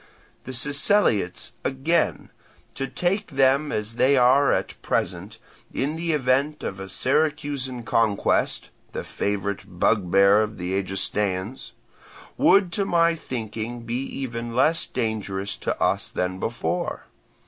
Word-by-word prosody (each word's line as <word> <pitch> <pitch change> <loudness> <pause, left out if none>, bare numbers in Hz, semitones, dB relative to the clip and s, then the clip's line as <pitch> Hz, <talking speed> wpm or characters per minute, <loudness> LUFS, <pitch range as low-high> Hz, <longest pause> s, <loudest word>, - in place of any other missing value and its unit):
The 130 - -6
Siceliots, 140 - +1
again, 145 +6 0 0.4
to 135 - -3
take 195 +7 -1
them 135 +1 +2
as 110 +2 -3
they 135 +2 +4
are 130 +3 +5
at - - -2
present, - - -2 0.3
in 145 +4 -1
the 165 0 -1
event 140 +2 +1
of 95 - -4
a 95 0 -7
Syracusan 135 +1 -1
conquest 110 -3 +1 0.2
(the - - -4
favourite 100 -2 -3
bugbear 100 0 +4
of 110 -1 -3
the 90 +1 -3
Egestaeans), 95 +3 -2 0.6
would 195 -3 +4
to 200 - 0
my 170 -2 +3
thinking 120 -5 -5
be 120 +2 -3
even 120 -4 -5
less 155 +6 +3
dangerous 105 -4 -3
to - - -3
us - - +1
than 90 0 -2
before. 170 - -2
125 Hz, 125 wpm, -24 LUFS, 100-145 Hz, 0.6 s, are